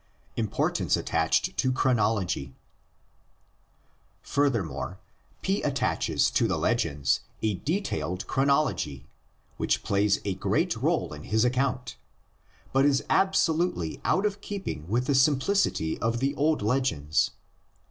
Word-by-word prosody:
IMPORTANCE 110 -3 0
ATTACHED - - 0
TO 130 - +2
CHRONOLOGY. 110 - 0 1.7
Furthermore 115 - -1 0.5
P 195 +1 0
attaches 140 -2 +1
to - - +2
the - - 0
legends 70 -1 +1 0.2
a 110 -1 +2
detailed 100 - -2
chronology, 135 - 0 0.5
which - - 0
plays 100 0 +2
a 100 - 0
great 95 - 0
role - - 0
in 75 0 -9
his 110 +2 +2
account, 125 - -1 0.8
but 135 +1 +4
is 140 -1 +3
absolutely 175 - +1
out 195 - +2
of 200 -1 -1
keeping 195 - -5
with 120 +6 0
the 140 - +1
simplicity 135 - +2
of 115 +1 0
the 135 +2 0
old 150 -3 +1
legends. 105 - +1
125 Hz, 115 wpm, -27 LUFS, 95-145 Hz, 1.7 s, but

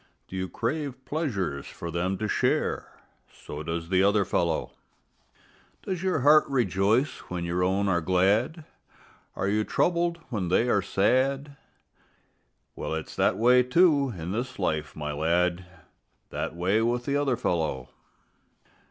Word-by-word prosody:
Do - - -9
you 95 0 -3
crave 140 -4 -3
pleasures 95 - -2
for 85 - -7
them 90 +3 -1
to 110 - -2
share? - - 0 0.4
So 75 - -8
does 85 +1 -4
the 95 0 +3
other 100 0 +3
fellow. 85 -3 0 1.1
Does 185 -3 -3
your 185 -6 0
heart 150 +3 +7
rejoice 115 +1 +1
when 90 -1 -3
your 90 +1 0
own 95 +2 +1
are 85 -3 +2
glad? 95 - +2
And 160 - -12 0.7
are 95 - -1
you 105 +2 +1
troubled 170 +6 +1
when 100 -6 -2
they 95 +7 +2
are 100 - +3
sad? 135 +8 +1 1.2
Well, - - -3
it's 80 - -6
that - - +2
way, 125 +3 +5
too, 140 +1 +3
in 85 +2 -5
this 120 +5 -3
life, 80 -5 -2
my 75 -1 -4
lad, 85 +4 0 0.6
That - - -4
way 95 +6 +1
with 120 +1 0
the 140 - 0
other 140 -4 +1
fellow. 80 - -1
100 Hz, 145 wpm, -27 LUFS, 90-130 Hz, 1.2 s, heart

